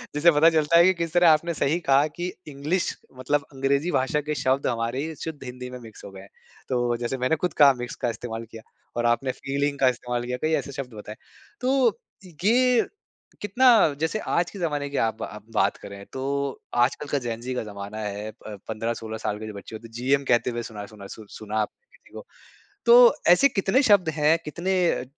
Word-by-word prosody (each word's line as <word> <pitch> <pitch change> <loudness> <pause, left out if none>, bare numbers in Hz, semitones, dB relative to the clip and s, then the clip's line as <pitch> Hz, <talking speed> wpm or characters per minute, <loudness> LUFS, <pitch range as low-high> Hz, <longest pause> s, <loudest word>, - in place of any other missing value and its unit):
जिससे 170 +3 +5
पता 155 +2 +5
चलता 160 0 +3
है। 170 - +8
कि 190 - +5
किस 170 -2 -4
तरह 175 -1 +6
आपने 165 +2 +3
सही 155 +3 0
कहा 140 -1 +3
कि 180 +1 -3 0.2
इंग्लिश 150 +5 -1 0.3
मतलब 140 +3 0
अंग्रेजी 140 +5 0
भाषा 135 +2 +1
के 150 +1 -3
शब्द 130 +1 0
हमारे 120 +3 -1
ही 160 -1 -6
शुद्ध 155 -4 -6
हिंदी 125 0 -7
में 125 0 -8
मिक्स 110 -2 -13
हो 100 - -9
गए 95 0 -11
हैं। 100 - -15 0.4
तो 120 -2 0
जैसे 120 +2 -3
मैंने 130 +5 +1
खुद 175 +2 -2
कहा 140 -2 +6
मिक्स 125 - -6
का 120 - +2
इस्तेमाल 115 0 -6
किया। 115 - -10 0.4
और 120 - 0
आपने 125 +3 +1
फ़ीलिंग 140 +2 -2
का 130 - +4
इस्तेमाल 120 -1 -3
किया, 125 +1 -3
कई 155 +1 0
ऐसे 140 - -1
शब्द 130 -3 -7
बताए। 105 0 -9 0.5
तो 255 -3 +2 0.4
ये 250 +2 +4 0.5
कितना 240 +6 +4 0.3
जैसे 160 +7 -1
आज 175 -4 0
के 200 - -9
ज़माने 145 -4 -2
की 140 - -4
आप 110 -1 -2
आप 105 0 -8
बात - - +2
करें 100 0 -10
तो 130 - -5 0.6
आजकल 135 +3 -1
का 145 - +2
जेन-ज़ी 120 0 -4
का 125 - -2
ज़माना 100 0 -8
है। 105 +1 -5
प 105 -2 -8
15-16 110 0 -4
साल 105 -1 -3
के 110 - -7
जो 110 - -7
बच्चे 100 +2 -9
होते 115 +1 -9
हैं - - -22
जीएम 135 +4 +1
कहते 120 -1 +2
हुए 120 -1 -4
सुना 105 -3 -7
सुना 100 -2 -12
सु 110 - -12
सुना 110 0 -5
आपने 475 - -8
किसी - - -24
को। - - -7
अ, - - -11 0.6
तो 485 +1 +8 0.2
ऐसे 280 - +6
कितने 210 +3 +2
शब्द 185 -5 +5
हैं 155 +2 +4
कितने 175 +5 -2 0.2
अ, - - -2
135 Hz, 215 wpm, -25 LUFS, 115-165 Hz, 0.6 s, है